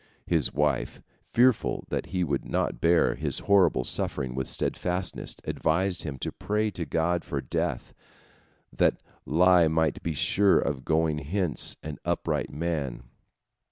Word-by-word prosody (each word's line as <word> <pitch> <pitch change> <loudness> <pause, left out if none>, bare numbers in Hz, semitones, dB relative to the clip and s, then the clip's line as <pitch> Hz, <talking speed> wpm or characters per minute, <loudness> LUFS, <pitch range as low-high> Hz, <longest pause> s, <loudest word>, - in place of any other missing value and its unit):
" - - -41
His 75 -6 +2
wife, 75 -2 0 0.3
fearful 125 -1 +2
that - - -2
he 90 -1 -1
would 70 -5 -1
not - - -2
bear 85 0 +4
his 70 0 -2
horrible 95 -10 +4
suffering 65 0 -2
with 65 0 -3
steadfastness, 90 +1 -2
advised 90 +3 0
him 70 -4 -5
to - - -2
pray 105 +1 -1
to 85 -4 -3
God 85 +4 0
for - - -3
death, 80 -7 -3 0.8
that - - +2 0.3
lie 85 +3 +5
might 80 0 +1
be 80 -2 -3
sure 100 +7 +3
of 70 -2 -1
going 80 -1 +1
hence 85 +2 -1
an 75 -1 -6
upright - - -1
man. 75 -6 -3
80 Hz, 145 wpm, -27 LUFS, 70-90 Hz, 0.8 s, lie